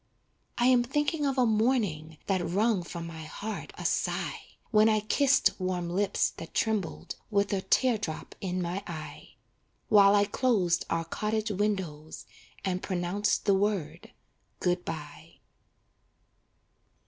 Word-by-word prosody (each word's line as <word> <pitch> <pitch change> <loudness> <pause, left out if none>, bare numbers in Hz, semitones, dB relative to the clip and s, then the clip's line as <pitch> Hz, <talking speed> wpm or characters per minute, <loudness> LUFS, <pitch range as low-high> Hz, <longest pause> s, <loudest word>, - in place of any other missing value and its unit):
I 240 - +2
am 250 -1 +5
thinking 295 +4 0
of 270 -1 -1
a 255 - +4
morning 210 -9 +1
That 190 -3 0
wrung 200 +4 +1
from 170 0 -7
my 165 -1 -8
heart 210 +7 -6
a - - -7
sigh, - - -1 0.3
When 215 0 +5
I 215 -1 +2
kissed 275 +6 +3
warm 180 -2 -2
lips 195 +2 +1
that 165 - -9
trembled, 215 -6 -1
With 205 -1 +1
a 195 - 0
tear 245 +2 +2
drop 160 -7 -5
in 185 -1 -2
my 175 +3 -3
eye; 160 -3 -8 0.5
While 200 -1 +7
I 205 0 +4
closed 200 -6 +1
our 165 0 -1
cottage 215 +5 -2
windows 185 -7 -3 0.4
And 185 -1 -1
pronounced 185 +2 -1
the 200 - +4
word 195 -4 -1 0.5
good 180 0 0
bye. 155 0 -8
200 Hz, 135 wpm, -29 LUFS, 175-220 Hz, 0.5 s, While